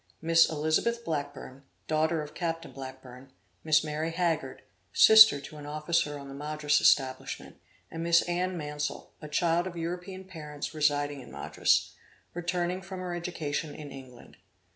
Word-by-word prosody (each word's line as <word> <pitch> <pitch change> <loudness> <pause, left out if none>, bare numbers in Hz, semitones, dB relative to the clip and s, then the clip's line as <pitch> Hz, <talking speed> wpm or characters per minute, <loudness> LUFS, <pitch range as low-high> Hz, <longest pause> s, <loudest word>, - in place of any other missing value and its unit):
Miss 165 +1 +4
Elizabeth 155 +10 0
Blackburne, 145 -3 -5 0.3
daughter 155 +1 +1
of 150 - -10
Captain 165 -1 -4
Blackburne; 130 -1 -10 0.3
Miss 155 -1 +4
Mary 155 +1 -2
Haggard, 165 -6 -2 0.3
sister 220 -8 +8
to 145 +2 -11
an 145 -1 -9
officer 150 0 -1
on 140 -1 -9
the 135 - -9
Madras 150 +1 0
establishment, 130 -2 +1 0.3
and 165 - -5
Miss 170 0 +4
Anne 180 +1 -2
Mansel, 150 -1 -5
a 150 - -7
child 170 +3 +1
of 175 -2 -7
European 180 +3 -5
parents 150 -6 -7
residing 145 -2 0
in - - -13
Madras, - - +1 0.4
returning 175 +1 -2
from 190 0 -8
her 180 -1 -4
education 160 -4 -4
in 150 -2 -9
England. 130 -3 -13
155 Hz, 145 wpm, -29 LUFS, 145-175 Hz, 0.4 s, sister